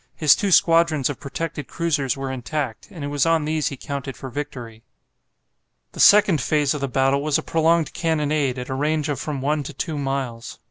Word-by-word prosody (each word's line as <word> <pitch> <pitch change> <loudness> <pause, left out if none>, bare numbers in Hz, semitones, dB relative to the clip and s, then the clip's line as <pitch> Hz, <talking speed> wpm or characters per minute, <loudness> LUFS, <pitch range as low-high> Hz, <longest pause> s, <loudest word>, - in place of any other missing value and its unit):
His 150 -3 +5
two 200 - -1
squadrons 165 -5 +3
of 140 - -9
protected 150 0 -5
cruisers 150 -6 -1
were 135 -1 -4
intact, 130 -2 -4
and 165 -5 -9
it 145 - -3
was 145 +1 +1
on 165 -2 +2
these 155 0 0
he 140 - -4
counted 140 -1 -6
for 130 - -8
victory. 120 -5 -7 1.1
The - - -12
second 200 -6 +6
phase 150 -2 +1
of 150 - -5
the 140 - -1
battle 135 +2 +1
was 150 0 +1
a - - -4
prolonged 165 -1 +1
cannonade 150 -5 0
at 125 0 -6
a - - -2
range 150 +2 -1
of 140 -3 -2
from 145 -3 -4
one 150 +2 0
to 145 +2 -7
two 155 +2 -4
miles. 135 -4 -4
145 Hz, 200 wpm, -22 LUFS, 135-155 Hz, 1.1 s, second